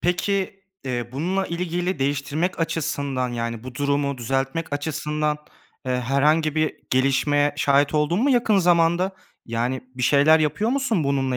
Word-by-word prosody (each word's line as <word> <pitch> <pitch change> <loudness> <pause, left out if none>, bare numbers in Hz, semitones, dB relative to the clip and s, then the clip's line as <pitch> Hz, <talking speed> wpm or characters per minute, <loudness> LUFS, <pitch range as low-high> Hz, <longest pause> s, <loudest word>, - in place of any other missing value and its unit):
peki, 195 +2 -1 0.2
eee, 120 -3 -3
bununla 185 +8 -1
ilgili 175 +1 -2
değiştirmek 145 +6 -1
açısından, 140 -5 -1
yani, 115 -1 -4
bu 130 -1 -8
durumu 140 0 0
düzeltmek 135 +6 -2
açısından, 150 +1 -2 0.5
eee, 130 0 0
herhangi 150 +5 +2
bir 155 0 0
gelişmeye 140 +2 +2
şahit 140 +1 +2
oldun 155 +7 +1
mu 280 - +3
yakın 235 -5 +3
zamanda? 175 +1 +2 0.3
Yani 120 +3 -2
bir 125 - -5
şeyler 145 +4 +5
yapıyor 160 +9 0
musun 255 - 0
bununla 135 -2 0
145 Hz, 135 wpm, -23 LUFS, 135-170 Hz, 0.5 s, şeyler